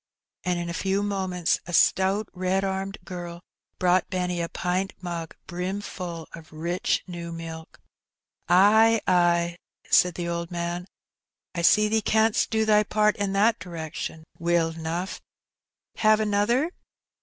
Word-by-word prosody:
And 180 -2 0
in 175 0 -3
a 170 - -4
few 195 +3 0
moments 190 -4 0
a 175 - -6
stout 190 +4 +3
red 185 +1 0
armed 195 0 -3
girl 175 -1 -7 0.4
brought 180 0 +2
Benny 180 -2 -1
a 170 - -3
pint 185 +2 -2
mug, 170 -3 -5
brimful 180 -2 -5
of 165 -1 -11
rich 170 +3 -1
new 170 -2 -7
milk. 165 -1 -8 0.7
''Ay, 220 +5 +6
ay," 175 -1 +2 0.3
said 180 -2 +5
the 175 -1 -3
old 170 0 -3
man, 175 +1 -3 0.7
"I 170 - -2
see 210 +5 +5
thee 220 +1 +1
canst 220 +1 +2
do 220 0 +1
thy 210 -1 +5
part 210 0 +2
in 200 -1 -1
that 215 +3 +3
direction 160 -2 -6 0.2
weel 170 -1 +1
eno'. 165 +3 -3 0.9
Have 215 0 +4
another?" 215 +9 +1
180 Hz, 140 wpm, -26 LUFS, 170-200 Hz, 0.9 s, Ay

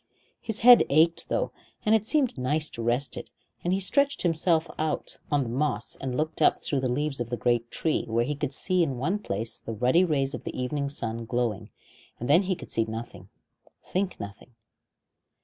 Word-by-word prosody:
His 225 -2 -4
head 245 +1 +9
ached 160 +4 +3
though, - - 0 0.3
and 215 - +4
it 220 -1 +2
seemed 285 -4 +2
nice 150 +4 0
to 115 - -6
rest 120 +4 0
it, - - -7 0.3
and 175 - 0
he 190 - +2
stretched 280 +9 +2
himself 165 -1 +2
out 155 0 -2
on 145 -2 +3
the 120 - -5
moss 125 -3 -1
and 130 -2 -4
looked 155 +1 -2
up - - +4
through 140 - -1
the 130 -2 -1
leaves 145 +1 -1
of 120 -1 -3
the 120 - -2
great 120 -1 +1
tree, 160 - -1
where 115 +1 +1
he 150 - -1
could 145 -1 -3
see 185 +6 +1
in 140 -6 0
one 180 +11 0
place 110 - -4
the 115 - -6
ruddy 125 - +3
rays 145 -5 0
of - - -6
the - - -5
evening 140 +2 -2
sun 115 -4 -4
glowing, 120 -3 -2 0.5
and 120 - -4
then 160 +6 +6
he 190 -1 -1
could - - -11
see 115 - +1
nothing 110 -4 -7 0.6
think 185 0 -2
nothing. 100 +4 -9
140 Hz, 200 wpm, -27 LUFS, 120-170 Hz, 0.6 s, head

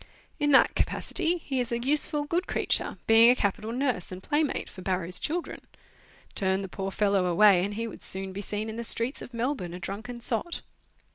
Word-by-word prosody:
In 290 -1 +1
that 270 - +5
capacity 355 -1 -1
he 275 -5 -4
is 245 -1 -2
a 235 - 0
useful, 290 +4 +3
good 345 +5 -1
creature, - - 0
being 225 +1 +7
a 250 - +5
capital 215 0 -2
nurse 245 -8 -2
and 185 +1 -8
playmate 295 0 -1
for 185 - -11
Barrow's 180 -1 -1
children. 340 +3 -4 0.7
Turn 190 0 0
the - - -5
poor 195 +1 -5
fellow 200 -2 +1
away, 180 +1 +5
and 205 +2 -3
he 230 +2 -3
would 220 - -10
soon 190 0 +1
be 200 - -5
seen 210 +2 -3
in 220 0 -6
the 235 - -4
streets 230 +3 +3
of - - -9
Melbourne 235 -7 -3
a - - -8
drunken 215 +7 -6
sot. 240 +8 -3
225 Hz, 200 wpm, -27 LUFS, 195-265 Hz, 0.7 s, being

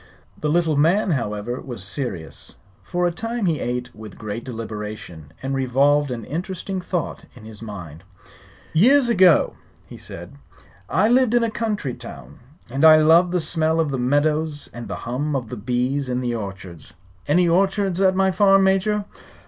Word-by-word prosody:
The 150 - -3
little 165 -1 +2
man, 175 +6 +3
however, 115 -3 -3
was 120 -8 -7
serious. 95 - -5 0.3
For 175 - -2
a 175 - +2
time 230 +4 -3
he 160 -5 +1
ate 125 0 -3
with 110 -3 -11
great 110 +1 -5
deliberation 105 - -7
and 135 +1 -2
revolved 135 +2 +2
an 115 -3 -5
interesting 185 - -4
thought 180 -2 -4
in 115 -3 -13
his 110 -1 -11
mind. 90 -7 -9 0.7
"Years 245 - +5
ago." 185 -8 +5 0.4
said - - -9
he, 70 -2 -22 0.3
"I 195 +5 +3
lived 245 0 +3
in 240 - +3
a 230 - 0
country 210 - -2
town; 65 - -11 0.3
and 135 +4 -1
I 160 -1 +9
love 165 +3 +5
the 180 0 0
smell 160 -1 +1
of 155 -3 +1
the 135 - -2
meadows 145 +3 0
and 120 0 -7
the - - -4
hum 140 +5 -2
of 125 -4 -3
the 125 - -5
bees 125 +4 -1
in 125 0 -1
the 120 -1 -2
orchards. 95 -6 -7 0.3
Any 175 +4 +3
orchards 195 +1 +1
at 190 -1 +4
my 190 0 +3
farm, 195 0 +4
Major?" 195 +2 +1
145 Hz, 170 wpm, -22 LUFS, 115-185 Hz, 0.7 s, I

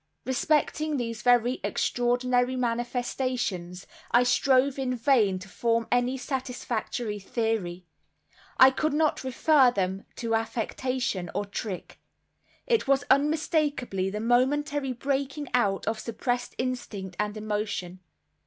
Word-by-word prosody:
Respecting 300 +3 +1
these 230 -3 -3
very 245 +1 +3
extraordinary 245 +1 +1
manifestations 240 -6 -2 0.2
I 240 +1 +5
strove 260 +2 +3
in 255 -1 -1
vain 230 -6 +3
to 185 +1 -9
form 230 +2 0
any 245 +2 +2
satisfactory 245 -4 -3
theory—I 200 +3 0
could 310 +3 -1
not 310 -2 +1
refer 265 +1 +4
them 190 -3 -2
to 230 -1 -2
affectation 225 -3 -2
or 205 - -1
trick. 200 -1 -6 0.7
It 475 - +1
was 275 0 +3
unmistakably 285 - +1
the 210 +2 -4
momentary 270 +4 +1
breaking 275 +3 -2
out 205 -6 +1
of 220 0 -1
suppressed 245 +2 -3
instinct 215 -7 -4
and 210 0 -1
emotion. 205 -4 -3
245 Hz, 110 wpm, -27 LUFS, 215-265 Hz, 0.7 s, I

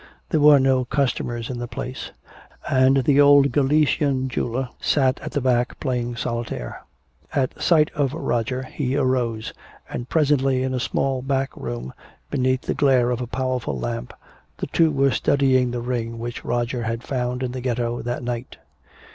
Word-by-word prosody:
There - - +2
were 145 -1 +7
no 130 -1 +3
customers 120 -3 -1
in 120 - -5
the 120 - -4
place, 125 +2 -6 0.6
and 130 0 +4
the 145 +2 +4
old 140 -1 +6
Galician 140 -1 +2
jeweler 125 +1 -2
sat 130 -3 +2
at 155 - -7
the 145 - 0
back 125 -1 +1
playing 120 -3 -2
solitaire. 115 - -4 0.5
At 130 -2 -1
sight 155 -3 +4
of 140 -1 -1
Roger 125 -3 -1
he 130 0 -3
arose; 125 -5 0 0.3
and 120 0 -6
presently 135 -4 +2
in 130 0 -1
a 130 - -1
small 130 +1 -1
back 135 0 -1
room, - - -6 0.4
beneath 130 -2 +1
the - - -1
glare 130 -4 +3
of 125 0 -2
a 125 - -3
powerful 130 - -2
lamp, - - -4 0.5
the - - -3
two 165 -1 +3
were 140 -2 +2
studying 130 0 +2
the 120 0 -3
ring 115 -2 -3
which 120 +1 -6
Roger 120 +1 -1
had 115 +1 -3
found 125 -1 -2
in 125 - -2
the 130 0 -5
ghetto 120 -1 -1
that 120 +1 -4
night. 120 0 -5
130 Hz, 165 wpm, -23 LUFS, 120-135 Hz, 0.6 s, were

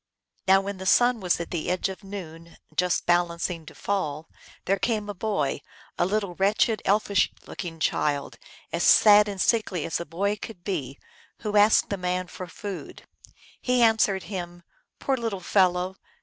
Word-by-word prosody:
Now 190 0 +6
when 200 -1 -6
the 190 - -5
sun 245 +4 +4
was 180 -4 0
at 170 - -6
the 170 -1 -2
edge 180 +2 0
of 190 +1 -8
noon, 170 -4 -9 0.2
just 180 -1 +1
balancing 170 -1 0
to - - -11
fall, 160 -6 -2 0.4
there 195 0 +1
came 215 -2 -1
a 205 - -4
boy, 195 -9 -1 0.3
a 175 - +1
little 200 -2 -1
wretched, 205 +4 +1
elfish 200 -1 +2 0.2
looking 165 -3 -7
child, 145 -2 -1 0.3
as 170 - -1
sad 210 +2 +7
and 200 -2 -5
sickly 190 -5 +1
as - - -2
a 170 - -5
boy 200 +6 -1
could 200 -4 -9
be, 145 -9 -3 0.4
who 210 -1 -3
asked 210 +1 +5
the 200 - -1
man 180 0 -2
for 185 0 -8
food. 200 0 -8 0.6
He 250 -1 +2
answered 220 -4 +3
him, 175 -3 -7
" - - -42
Poor 270 - 0
little 225 -5 -3
fellow 185 0 +1
190 Hz, 170 wpm, -26 LUFS, 175-205 Hz, 0.6 s, sad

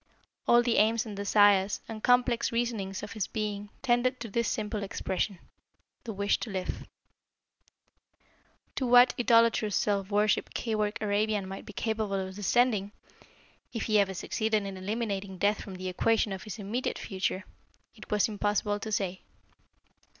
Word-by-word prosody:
All 240 0 +6
the 235 -1 +1
aims 225 +3 +3
and 210 -2 -7
desires 200 0 +4
and 220 -1 -7
complex 245 -1 +3
reasonings 225 -5 -2
of 210 - -6
his 215 -4 -2
being 210 -1 -4
tended 250 0 +2
to 230 - -5
this 235 +3 0
simple 210 -1 -2
expression 195 0 -2 0.7
the 230 - -4
wish 200 0 0
to 235 - -5
live. 190 -2 -4 1.9
To 260 - 0
what 245 +1 +7
idolatrous 230 -3 +4
self 200 -2 0
worship 210 0 +1
Keyork 215 -2 -1
Arabian 210 -1 0
might 195 0 -8
be 210 - -9
capable 220 -2 -1
of 190 -1 -3
descending, 210 0 +1 0.8
if 230 - -2
he 215 -2 +3
ever 195 -1 +1
succeeded 215 +2 -1
in 195 -1 -5
eliminating 200 -1 -3
death 205 +3 +1
from 195 - -8
the 185 0 -5
equation 210 +3 +1
of 190 - -6
his 215 - -6
immediate 220 +5 -3
future, 190 0 -2 0.5
it 215 - -13
was 210 -1 +2
impossible 205 -1 0
to 220 +1 -5
say. 190 -3 -1
210 Hz, 150 wpm, -29 LUFS, 195-225 Hz, 1.9 s, what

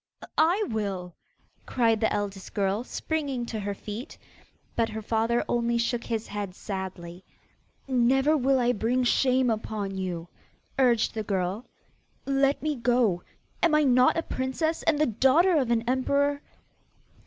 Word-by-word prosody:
'I 360 +7 +3
will,' 195 -5 -3 0.5
cried 230 -3 +2
the 220 - +1
eldest 200 -2 -4
girl, 200 +2 0
springing 280 -3 -3
to 225 -2 -5
her 200 0 -3
feet. 215 - -8 0.6
But 230 -1 +1
her 220 0 -5
father 230 +2 0
only 235 0 +1
shook 235 0 -1
his 225 -2 -2
head 200 -3 -5
sadly. 190 -3 -6 0.6
'Never 265 +4 +3
will 270 -1 +2
I 245 0 +3
bring 245 +3 0
shame 255 0 +3
upon 215 -3 -3
you,' 175 -3 -4 0.5
urged 240 -4 +3
the 220 - -3
girl. 195 +2 -2 0.6
'Let 275 +1 +1
me 305 -1 0
go. 235 -7 +2 0.4
Am 335 -3 +4
I 305 - +4
not 255 0 +4
a 330 - 0
princess, 315 +6 -2
and 315 - +2
the 305 - +3
daughter 270 - +3
of 265 -6 +1
an 230 -1 +2
emperor? 280 +3 +1
235 Hz, 145 wpm, -27 LUFS, 205-270 Hz, 0.6 s, Am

